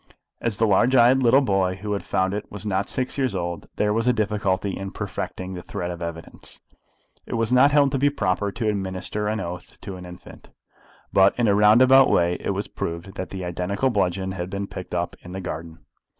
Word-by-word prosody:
As 115 -3 -2
the 115 - +3
large 110 +5 +3
eyed 125 +2 +6
little 130 +3 +5
boy 95 -6 +1
who 105 +2 -4
had 100 - -2
found 95 +1 0
it 105 - -5
was 105 0 -8
not 100 -1 0
yet - - -11
six 130 +2 -2
years 130 -7 0
old, 85 -3 -4
there 105 0 +1
was 115 +2 0
a - - +6
difficulty 105 -3 0
in 95 +1 -5
perfecting 95 -1 -5
the 90 - -6
thread 85 0 -5
of 85 - -7
the 85 - -3
evidence. 85 -1 -8 0.7
It - - -3
was 115 +1 0
not 135 +3 +6
held 140 -2 +4
to 135 - 0
be 145 +2 +4
proper 100 -6 -1
to 110 +2 -3
administer 100 +1 -2
an 110 +1 -1
oath 90 +1 -7
to 95 -2 -7
an 90 0 -9
infant. 90 0 -13 0.6
But 95 0 +5
in 120 -2 +2
a 100 - +4
roundabout 125 +6 +6
way 85 +1 +2
it - - -4
was - - -3
proved 85 +3 -5
that 95 - -5
the 95 -2 -5
identical 90 +8 -1
bludgeon 95 -2 0
had 90 -1 -4
been 100 +1 -3
picked - - -7
up - - -2
in 90 - -10
the 95 - -4
garden. 80 -2 -7
100 Hz, 220 wpm, -24 LUFS, 90-115 Hz, 0.7 s, eyed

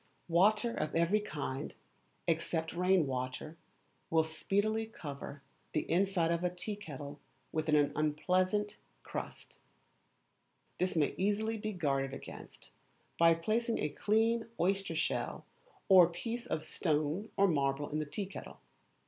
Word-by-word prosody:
Water 210 +7 +4
of 155 - -2
every 170 +6 +3
kind, 145 -7 -4 0.5
except 160 -1 0
rain 180 -1 +3
water, 130 +4 -4 0.5
will 160 -1 +4
speedily 205 +7 0
cover 145 -7 -8 0.3
the 155 - +2
inside 180 -2 +2
of 170 +1 0
a 180 - +3
tea 180 +4 -4
kettle 145 -7 -8 0.3
with 155 0 -1
an 150 -1 +4
unpleasant 185 +7 +1 0.3
crust; - - -7 1.2
this 185 0 +1
may 155 -3 +2
easily 210 +3 +1
be 215 +1 -2
guarded 135 -7 0
against - - -11 0.5
by 165 0 +7
placing 225 +8 0
a - - 0
clean 225 +7 +2
oyster 190 -1 +1
shell 160 - -1 0.4
or 185 -3 +9
a - - -9
piece 235 +7 -4
of 155 - -2
stone 155 +6 -1
or 200 - +6
marble 140 -3 +1
in 155 - 0
the 155 - -1
tea 200 +7 -3
kettle. 195 - -9
170 Hz, 135 wpm, -33 LUFS, 155-205 Hz, 1.2 s, or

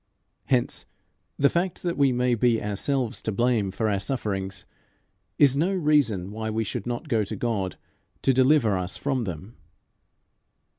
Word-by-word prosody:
Hence, 125 -3 0 0.5
the 140 - +5
fact 175 +4 -1
that 175 -1 -1
we 140 -2 +3
may 125 0 +1
be 120 0 +2
ourselves 115 +4 -1
to 110 - -2
blame 115 -1 +1
for 110 +4 -1
our 100 -2 +1
sufferings 95 -4 -3 0.7
is 140 -2 +5
no 165 +7 +1
reason 140 - +2
why 110 +1 -4
we 110 +1 -1
should 110 +1 -5
not 120 +5 -3
go 115 -6 +1
to 105 +2 -5
God 100 -4 -2 0.5
to 135 - +4
deliver 130 -4 +4
us 90 0 -2
from 135 -4 -1
them. 95 +5 -7
115 Hz, 155 wpm, -25 LUFS, 100-135 Hz, 0.7 s, the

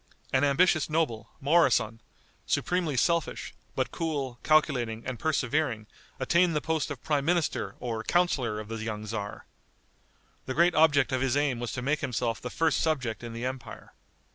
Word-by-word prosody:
An 130 +1 +3
ambitious 155 +3 +3
noble, 120 -9 -1
Moroson, 135 -7 +3 0.5
supremely 175 -6 0
selfish, 170 +4 0 0.2
but - - -1
cool, 140 -7 -3
calculating 125 -8 +2
and 130 -3 -4
persevering, 150 -7 0 0.3
attained 170 +5 +3
the - - +3
post 160 0 -1
of 145 -5 -7
prime 145 -2 +1
minister 170 0 0
or 115 -2 -3
counselor 130 -12 +1
of 105 - -7
the 115 +1 -5
young 110 -1 -4
tzar. 105 -1 -5 1.0
The 130 - -3
great 175 +2 +4
object 150 -4 +4
of 130 -1 0
his 135 +1 +1
aim 140 -4 +1
was 120 -3 -3
to 125 - -4
make 150 +3 +1
himself 120 -4 -2
the 125 - -5
first 165 +4 +1
subject 130 -9 -1
in 115 -1 -6
the 115 +2 -4
empire. 130 -3 -7
135 Hz, 165 wpm, -28 LUFS, 115-155 Hz, 1.0 s, great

